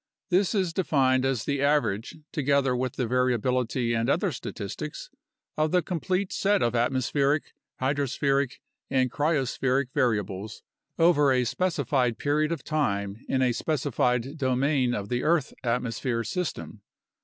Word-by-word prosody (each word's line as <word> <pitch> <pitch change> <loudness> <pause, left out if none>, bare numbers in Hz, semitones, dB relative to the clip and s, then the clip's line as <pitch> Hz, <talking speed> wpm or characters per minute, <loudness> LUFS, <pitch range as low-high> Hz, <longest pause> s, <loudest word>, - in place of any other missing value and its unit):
This 190 +4 +2
is 185 -4 0
defined 135 -7 +2
as 130 -4 0
the 140 -1 -1
average 140 -7 +1 0.2
(together 140 -3 +1
with 125 0 -2
the 125 - -1
variability 125 0 +1
and 115 +2 0
other 165 - +1
statistics) - - -6 0.4
of 155 0 +1
the 180 +1 +2
complete 185 +2 -2
set 200 0 +2
of 120 - +1
atmospheric, 135 +4 +1 0.3
hydrospheric, 140 0 0 0.3
and 130 -2 +1
cryospheric 135 -3 0
variables 105 -3 -1 0.3
over 150 -4 +4
a 125 -1 +3
specified 135 -6 0
period 150 +2 +1
of 170 - -3
time 100 -9 -1
in 130 -1 +2
a 125 - +3
specified 130 0 -1
domain 130 -1 +1
of 100 -2 -4
the 125 0 0
earth 160 0 +1
atmosphere 115 0 -1
system. 180 - -4
135 Hz, 130 wpm, -27 LUFS, 125-150 Hz, 0.4 s, over